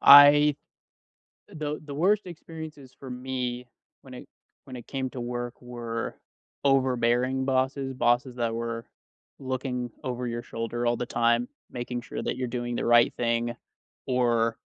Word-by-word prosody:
I 145 +1 +9 0.9
the 150 -1 -4
the 145 - -6
worst 195 +8 +2
experiences 160 -6 -9
for 135 - -8
me 125 -1 -3 0.3
when 130 - -12
it - - -10 0.4
when 130 - -9
it 120 - -9
came 130 -2 -2
to 125 - -5
work 120 0 -4
were 120 -2 -4 0.5
overbearing 130 -1 +2
bosses. 135 0 0
Bosses 120 0 +2
that 115 -1 0
were 115 0 -3 0.5
looking 130 -2 -3
over 125 -1 -3
your 120 0 -3
shoulder 115 0 -3
all 120 0 +2
the - - -2
time, 120 0 +2 0.2
making 120 -1 -4
sure - - -6
that - - -1
you're 130 - -1
doing 120 0 -3
the - - -1
right 120 0 +6
thing, 120 0 0 0.5
or, 120 -3 +2
125 Hz, 145 wpm, -27 LUFS, 120-135 Hz, 0.9 s, I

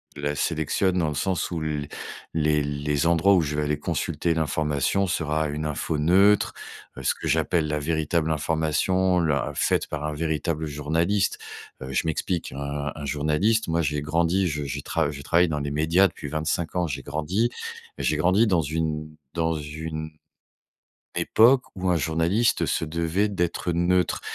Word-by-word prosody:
la 75 0 -2
sélectionne 85 +5 0
dans 80 - +1
le 75 - -2
sens 95 +4 -1
où 85 - -3
l 75 -2 -2 0.5
les 75 -1 +2
les 75 +1 -1
endroits 85 +4 +4
où 90 - +5
je 75 -1 -2
vais 75 - 0
aller 75 0 -1
consulter 85 0 -1
l'information 80 +4 0
sera 80 -3 0
une 75 +1 -3
info 75 +1 -2
neutre. 95 +7 +4 0.4
Heu, - - -6
ce - - +1
que - - -6
j'appelle 80 -3 +1
la 75 0 -1
véritable 80 +1 0
information 80 +4 +1
l'in 75 -5 0
faite - - +1
par 75 -1 -4
un 75 - -2
véritable 80 0 -2
journaliste. 80 +7 0 0.4
Heu 65 0 -6
je - - +1
m'explique, 80 +2 -2
un 70 +1 -4
un 75 - -6
journaliste 75 +10 +1
moi, 85 +1 +1
j'ai 75 -1 -1
grandi, 85 +5 +1
je 75 -3 -3
je 70 +1 -4
trav 80 0 0
je 70 -1 -8
travaille 85 +4 +3
dans 75 -2 -2
les 70 0 -3
médias 80 +6 +4
depuis 80 - -8
25 80 +3 -2
ans. 90 -1 +1
J'ai 75 - -4
grandi 80 +11 -1 0.5
j'ai 75 - 0
grandi 95 +8 +4
dans 90 -6 +2
une 75 0 -3 0.2
dans 80 -1 0
une 80 +1 -5 1.1
époque 125 +4 +5
où 95 0 -2
un 90 - +3
journaliste 85 +8 +1
se - - 0
devait, 85 +5 0
d'être 90 -2 -1
neutre. 90 +2 +1
80 Hz, 170 wpm, -25 LUFS, 75-85 Hz, 1.1 s, où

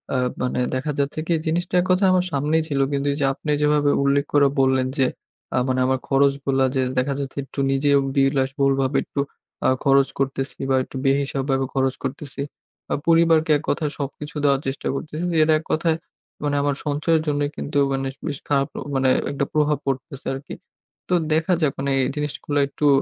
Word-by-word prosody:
আ - - +2 0.2
মানে 125 0 -1 0.2
দেখা 140 +4 -1
যাচ্ছে 140 +2 -1
কি 170 - +2
জিনিসটা 175 +3 -1
এক 180 - -3
কথায় 190 +1 +4
আমার 180 -1 +2
সামনেই 150 +3 +1
ছিল। 140 -3 -1
কিন্তু 140 0 -1
এই - - -5
যে - - +3
আপনি 150 - -4
যেভাবে 150 -1 +3
উল্লেখ 140 +1 +2
করে 145 -1 +5
বললেন 130 -1 +3
যে, 135 - +4 0.5
আ - - +2
মানে 130 0 +1
আমার 130 0 +1
খরচগুলা 135 -1 +2
যে 130 - +2 0.2
দেখা 135 +2 +1
যাচ্ছে 140 0 -5
একটু 140 - -8
নিজেও 140 +1 +3 0.2
বিলাসবহুল 135 0 +2
ভাবে 135 +1 +1
একটু - - -6 0.5
আ - - +5
খরচ 140 -1 +4
করতেছি 135 0 -2
বা 135 - +3
একটু - - -13
বেহিসাব 135 0 +1
ভাবে 135 0 +1
খরচ 135 -1 +1
করতেছি। 140 +1 -5 0.5
আ - - +2
পরিবারকে 165 -1 +4
এক 145 - -10
কথায় 150 -3 0
সবকিছু 145 +2 -6
দেওয়ার 140 -1 +3
চেষ্টা 135 - -3
করতেছি। 155 +4 -5 0.2
যেটা 155 0 +5
এক 160 - -14
কথায় 160 0 +1 0.5
মানে 145 -1 0
আমার 145 -1 0
সঞ্চয়ের 155 +2 +1
জন্যই 145 -1 0
কিন্তু 145 - -3
মানে 135 0 -1 0.2
বেশ 145 -3 -3
খারাপ 140 -1 +2 0.3
মানে 130 0 +3 0.2
একটা 140 0 -1
প্রভাব 150 -1 +2
পড়তেছে 135 +1 -4
আরকি। 135 +2 -7 0.6
তো - - +1 0.2
দেখা 160 +3 +2
যাক 150 - +3
মানে 140 0 -1
এই 130 - +1
জিনিসগুলা 150 0 -2
এটটু 145 +1 -1
140 Hz, 190 wpm, -22 LUFS, 135-150 Hz, 0.6 s, করে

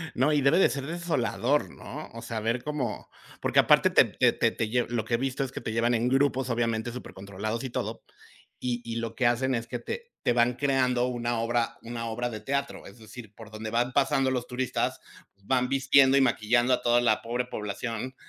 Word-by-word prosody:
no, 140 +5 +2
y 145 - +3
debe 140 +7 +4
de - - +5
ser 140 -1 -4
desolador, 150 -4 0
¿no? 150 +3 -9
O 115 - -8
sea, 115 -1 -4
ver 115 +3 -1
cómo 145 -6 -4 0.3
porque - - +2
aparte - - +5
te - - +6
te - - +2
te - - +1
te 110 - -3
lle 120 +1 +1
lo 115 -3 -2
que 115 - 0
he - - +1
visto 135 +2 -2
es 130 - -5
que - - -6
te 110 - -4
llevan 115 +2 +1
en 120 +2 +1
grupos, 135 -1 +1
obviamente, 115 -1 -1
súper 125 +1 -9
controlados 100 +4 -5
y 130 - -4
todo, - - -4 0.6
y 120 -1 -2
y 115 0 -4
lo 115 -1 -4
que 125 -3 +2
hacen 130 +2 +1
es 115 0 -4
que 120 - -4
te 475 - -7
te 120 - +2
van 120 +1 +3
creando 125 -2 +1
una 120 -1 -2
obra 115 0 -1
una 115 0 -5
obra 120 +2 -2
de 110 -2 -7
teatro. 140 +4 -3
Es 100 +4 -14
decir, 110 -1 -11
por 110 -2 -12
donde 110 0 -6
van 120 +3 0
pasando 135 -1 +2
los 125 -2 -2
turistas, 125 0 -2 0.4
van 125 +3 +1
vistiendo 135 0 +5
y 140 - +5
maquillando 120 0 +2
a - - +1
toda 120 0 +3
la 110 -3 +2
pobre 120 +2 -2
población 115 +3 -5
120 Hz, 220 wpm, -27 LUFS, 115-130 Hz, 0.6 s, te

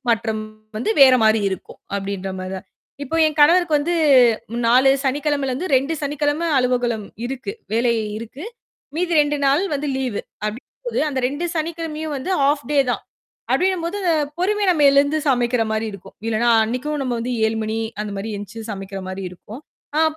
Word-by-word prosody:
மாற்றம் 220 -1 0 0.4
வந்து 245 - -1
வேற 260 -1 +8
மாதிரி 220 0 +4
இருக்கும். 190 - -7 0.2
அப்பிடின்றமாரி 190 -1 -4
தான். 190 - -10 0.4
இப்போ 320 +4 -3
என் 310 0 -3
கணவருக்கு 330 0 +5
வந்து 335 +4 -1 0.7
4 255 +3 +6
சனிக்கிழமைல 280 0 0
இருந்து 310 +6 -3
2 275 +5 0
சனிக்கிழமை 295 +3 0
அலுவலகம் 245 -4 0 0.2
இருக்கு. 265 +9 -5 0.2
வேலை 235 +1 +3 0.3
இருக்கு. 235 +8 -9 0.5
மீதி 345 0 0
2 295 0 0
நாள் 280 +6 +3 0.3
லீவு 255 -6 -2 0.2
அப்பிடின்னும்போது 245 - -5
அந்த 270 -2 -2
2 290 +6 -3
சனிக்கிழமையும் 315 -1 -3
வந்து 270 +8 -4
ஹாஃப் 285 +1 +2
டே 290 - +3
தான் - - -3 0.5
அப்பிடின்னும்போது 370 0 +1 0.4
பொறுமை. 415 +4 +1
நம்ம 310 -5 +3
எழுந்து 285 +2 +3
சமைக்கிறமாரி 235 -4 +1
இருக்கும். 195 0 -12
இல்லன்னா 230 +1 +2
அன்னக்கும் 260 +6 -3
நம்ம 245 -3 -2 0.3
7:00 220 0 -1
மணி, 220 +1 -2 0.2
அந்தமாரி 205 0 -4
எழுந்திரிச்சு 205 +3 -8
சமைக்கிறமாரி 195 -1 -6
இருக்கும். 210 +7 -11 0.4
ஆப் 315 -1 +1
260 Hz, 145 wpm, -21 LUFS, 220-300 Hz, 0.7 s, வேற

